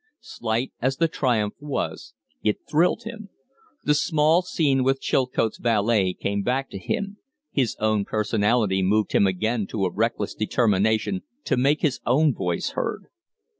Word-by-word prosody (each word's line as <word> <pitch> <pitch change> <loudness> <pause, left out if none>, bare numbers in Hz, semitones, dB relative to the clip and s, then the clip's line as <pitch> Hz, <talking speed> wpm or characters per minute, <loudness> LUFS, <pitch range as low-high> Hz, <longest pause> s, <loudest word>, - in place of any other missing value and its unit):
Slight 115 +3 -3
as 130 +2 0
the 165 - +3
triumph 120 -9 0
was, 130 -7 -4 0.3
it 105 -1 0
thrilled 165 +4 +2
him. 220 -2 -8 0.5
The 150 - +3
small 155 +2 +3
scene 145 -7 +1
with 135 +1 +2
Chilcote's 125 -5 0
valet 105 -4 +2
came 100 0 -2
back 130 +5 -1
to 100 - -6
him; 200 - -3 0.3
his 130 -5 0
own 110 -2 +1
personality 105 -1 +1
moved 105 +3 +1
him 100 - +4
again 110 +3 -1
to 100 -3 -1
a 90 - -2
reckless 110 -1 -1
determination 110 - +1 0.2
to - - +1
make 140 +4 +2
his 150 -5 +1
own 145 +5 +3
voice - - -2
heard. - - -4
120 Hz, 150 wpm, -24 LUFS, 105-145 Hz, 0.5 s, him